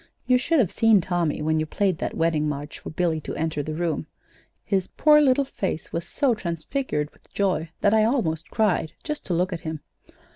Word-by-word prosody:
You 250 -1 +4
should 330 +5 +1
have 230 - +3
seen 225 -2 +5
Tommy 170 -4 -1
when 155 +1 +1
you 155 - -1
played 190 -1 0
that - - -3
wedding 160 -2 +1
march 145 0 -5
for - - -8
Billy 160 -1 0
to - - -5
enter 155 -2 -1
the 155 +2 -4
room. 170 -1 -2 0.6
His 190 -3 0
poor 300 -1 +5
little 275 -1 +3
face 190 - -4
was 170 +1 -3
so 275 -4 +2
transfigured 170 - -3
with - - -26
joy 185 -5 0
that 205 - +4
I 215 -1 +5
almost 170 - 0
cried, 190 -7 +1
just 300 -1 -4
to 175 - 0
look 180 +2 0
at 165 - -5
him. 160 -2 -5
175 Hz, 205 wpm, -24 LUFS, 160-220 Hz, 0.6 s, seen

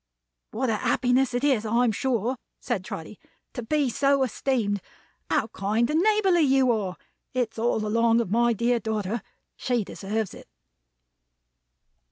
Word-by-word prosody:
"What 245 +1 -1
a 215 - 0
happiness 250 +2 +1
it 245 - -1
is, 265 -7 +2
I'm 230 +2 +2
sure," 245 +1 -1 0.2
said - - -2
Trotty, - - -8 0.3
"to 245 - -4
be 290 +4 +1
so 275 +2 +2
esteemed. 225 -5 -1 0.5
How - - +2
kind 215 +5 0
and 310 - +2
neighborly 395 -4 +3
you 270 -3 +4
are! 200 -5 -2 0.4
It's 235 -3 -1
all 225 -2 0
along 230 +2 +3
of 225 -6 -2
my 235 +2 +3
dear 235 +2 +1
daughter. 220 0 -2 0.3
She 245 -3 -1
deserves 205 +1 -4
it." - - -13
235 Hz, 145 wpm, -26 LUFS, 220-265 Hz, 0.5 s, you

